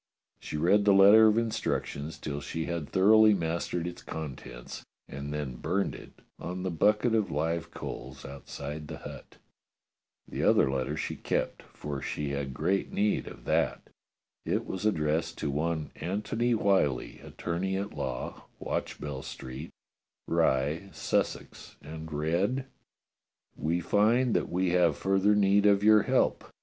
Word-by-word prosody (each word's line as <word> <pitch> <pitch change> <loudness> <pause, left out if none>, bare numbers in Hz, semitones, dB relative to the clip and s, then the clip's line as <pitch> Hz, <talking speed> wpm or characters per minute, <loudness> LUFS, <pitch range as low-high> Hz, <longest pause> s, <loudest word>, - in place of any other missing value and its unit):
She - - -5
read 100 +6 +3
the 100 -1 +6
letter 105 +3 +8
of 110 0 +3
instructions 80 -9 -2
till 70 0 -5
she 80 +2 -4
had 85 -4 -4
thoroughly 110 +2 +6
mastered 85 0 -2
its 90 0 -6
contents, 65 -6 -7 0.2
and 70 +2 -6
then 75 -4 -4
burned 95 +8 -1
it - - -13 0.2
on 90 +2 -5
the 95 - -1
bucket 105 +7 +2
of 110 -3 +2
live 80 +3 -1
coals 65 +2 -8
outside 70 +2 -7
the - - -7
hut. - - -11 0.9
The - - -4
other 65 - +4
letter 65 -1 -2
she - - -3
kept, - - -2
for 70 -2 -5
she 75 -1 -3
had 70 -1 -3
great 95 +8 -1
need 105 +1 0
of - - -11
that. - - 0 0.5
It - - -1
was 95 +3 -2
addressed 80 -3 0
to 70 - -2
one 80 +2 -2
Antony 105 +7 -1
Whyllie, 95 - +1
attorney 95 +3 -3
at 100 +1 -4
law, 65 -2 -5
Watchbell 70 -3 -4
Street, 65 +6 -8 0.6
Rye, 75 +8 +1
Sussex, - - -2
and 80 +1 -9
read: 85 - 0 0.9
We 85 +3 -1
find 110 +7 +3
that - - 0
we 90 0 0
have 85 -4 +3
further 95 +2 +3
need 100 0 +4
of 100 0 +4
your 110 0 +7
help. - - +1
85 Hz, 145 wpm, -29 LUFS, 75-100 Hz, 0.9 s, letter